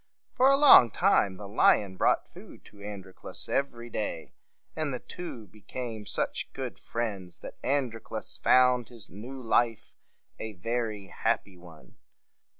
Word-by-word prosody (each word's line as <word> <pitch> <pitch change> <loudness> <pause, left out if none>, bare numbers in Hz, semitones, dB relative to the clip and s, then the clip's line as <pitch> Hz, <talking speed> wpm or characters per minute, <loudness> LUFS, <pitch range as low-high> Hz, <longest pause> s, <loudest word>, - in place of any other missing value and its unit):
For 260 +2 +4
a 275 - +5
long 275 - +9
time, 105 - +2
the 100 +1 -9
lion 100 -1 +3
brought - - +2
food - - -14
to 100 - -16
Androclus 100 -2 -7
every 120 -4 -2
day; 105 -8 -4 0.4
and 155 -2 -1
the 125 - -2
two 145 -10 -8
became 110 +2 -7
such - - -2
good - - -5
friends, 100 -7 -4
that - - -10
Androclus 115 -5 -2
found 125 -2 +4
his 115 -4 -13
new 120 +8 -8
life 115 -2 0 0.5
a 110 -1 -5
very 110 -1 -3
happy 95 - -1
one. 85 -3 -16
115 Hz, 140 wpm, -28 LUFS, 100-125 Hz, 0.5 s, long